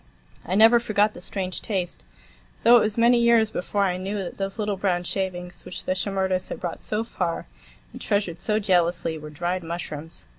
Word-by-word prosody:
I 185 - -2
never 225 +3 +7
forgot 215 -2 +2
the - - -10
strange 185 -1 -3
taste; 185 - -3 0.6
though 240 +1 +8
it - - +6
was 215 0 0
many 235 +1 +5
years 235 -2 +4
before 200 +2 -1
I 180 -2 +1
knew 195 +3 -3
that 195 -1 -5
those 195 +1 -3
little 210 -2 -1
brown 185 -2 0
shavings, 180 -1 -4
which 180 +1 -7
the - - -1
Shimerdas 190 -1 -1
had - - -6
brought 175 -2 -4
so 215 +1 -2
far 175 -7 -3 0.5
and - - -9
treasured 195 -5 -1
so 210 +3 +1
jealously, 175 -5 +1
were 150 0 -8
dried 175 +4 -2
mushrooms. 160 - -6
190 Hz, 190 wpm, -25 LUFS, 175-210 Hz, 0.6 s, though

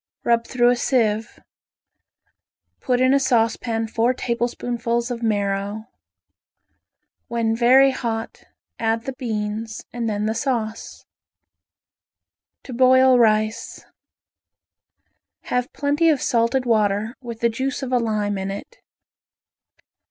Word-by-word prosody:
Rub 235 0 +1
through 245 -1 +3
a - - +2
sieve. 225 -3 0 1.4
Put 250 -1 0
in 255 +1 +4
a 280 - +4
saucepan 230 -3 0
four 230 +3 +1
tablespoonfuls 235 0 -2
of 240 -1 -4
marrow. 205 0 -2 1.4
When 230 -1 0
very 260 +3 +5
hot 230 -3 -5 0.3
add 225 0 0
the 270 - -5
beans 220 -3 -4
and 235 -2 -2
then 210 0 -2
the 220 - 0
sauce. 225 -3 -3 1.6
To 255 - -9
Boil 260 +1 +5
Rice 215 -1 0 1.6
Have 250 0 -2
plenty 290 +3 +1
of 300 -4 +2
salted 240 +2 +1
water, 215 0 +1
with 235 -3 -8
the 235 - +3
juice 260 +4 -3
of 260 - -4
a 250 - +3
lime 210 -3 -1
in 190 0 -4
it. 200 - -8
235 Hz, 115 wpm, -22 LUFS, 220-250 Hz, 1.6 s, very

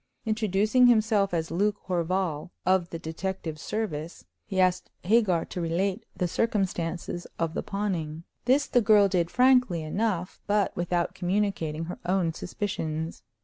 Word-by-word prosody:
Introducing 215 +3 +3
himself 215 -4 +3
as 165 -2 -2
Luke 205 +4 +1
Horval, 180 -2 -1 0.2
of 185 -2 +2
the 165 - -5
detective 160 0 -4
service, 170 -5 -4 0.2
he 190 -3 -2
asked 185 -1 +2
Hagar 190 -4 +3
to 180 - -5
relate 185 +6 -1
the 180 - +1
circumstances 175 -4 -1
of 165 -1 -1
the - - -2
pawning. 170 -6 -3 0.2
This 270 +3 +4
the 245 - +3
girl 210 -2 +6
did 175 -3 +1
frankly 250 -9 +4
enough, 185 +2 -2
but 205 -1 +1
without 175 0 -1
communicating 180 -4 -1
her 175 - -7
own 175 -2 +1
suspicions. 165 -4 -4
185 Hz, 140 wpm, -27 LUFS, 170-210 Hz, 0.2 s, girl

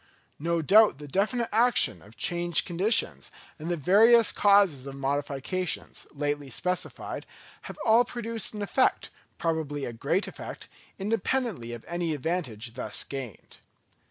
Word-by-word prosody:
No 165 +1 -1
doubt 210 +1 +6
the 145 0 -10
definite 220 - 0
action 235 +3 +3
of 105 +2 -18
changed 175 - +1
conditions, 190 +6 +1 0.3
and 160 +3 -5
the 175 - 0
various 220 - +5
causes 195 -10 +3
of 135 - -7
modifications, 140 +5 -3
lately 145 -1 -3
specified, 180 +7 -3 0.4
have - - -8
all 230 +2 +6
produced 230 -2 -3
an 210 - -3
effect, 255 +6 +1 0.3
probably 155 -4 -2
a 120 - -5
great 145 - -1
effect, - - -8 0.3
independently 215 - -1
of 120 -1 -8
any 170 -2 -2
advantage 130 -8 -3
thus 125 - -4
gained. 130 - -8
170 Hz, 130 wpm, -27 LUFS, 140-210 Hz, 0.4 s, doubt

